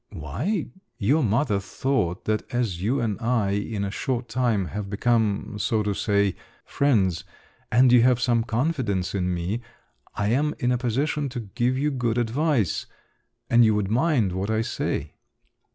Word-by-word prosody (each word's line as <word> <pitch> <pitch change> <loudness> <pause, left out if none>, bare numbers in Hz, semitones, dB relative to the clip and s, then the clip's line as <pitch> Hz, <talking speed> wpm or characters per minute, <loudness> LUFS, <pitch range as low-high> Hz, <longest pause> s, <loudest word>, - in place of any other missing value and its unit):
"Why? 140 - -3 0.3
Your 140 +10 +2
mother 110 -1 +1
thought 100 -4 -2
that 110 0 -2
as 115 -8 -1
you 120 +8 +1
and 110 -4 -1
I, 115 -4 +1
in 100 +1 -2
a 100 - -2
short 125 +1 -2
time, 115 -5 +1
have 100 +1 -5
become, 105 -1 0
so 110 0 +1
to 105 -1 0
say, 100 -1 +1 0.3
friends, 100 - +1 0.5
and 125 +1 +5
you 125 -1 +7
have 125 0 +4
some 120 -2 +2
confidence 115 - -1
in 90 -2 0
me, 90 +7 -2 0.5
I 105 0 0
am 145 +6 +1
in 125 - 0
a 125 - +2
position 140 +4 -1
to 120 -1 -5
give 120 +5 -1
you 150 +2 +1
good 120 -4 -1
advice—and 120 - -1
you 110 -2 +4
would 105 -1 -1
mind 125 - +2
what 95 +3 -3
I 110 0 +1
say." 120 - -3
115 Hz, 160 wpm, -25 LUFS, 100-125 Hz, 0.5 s, you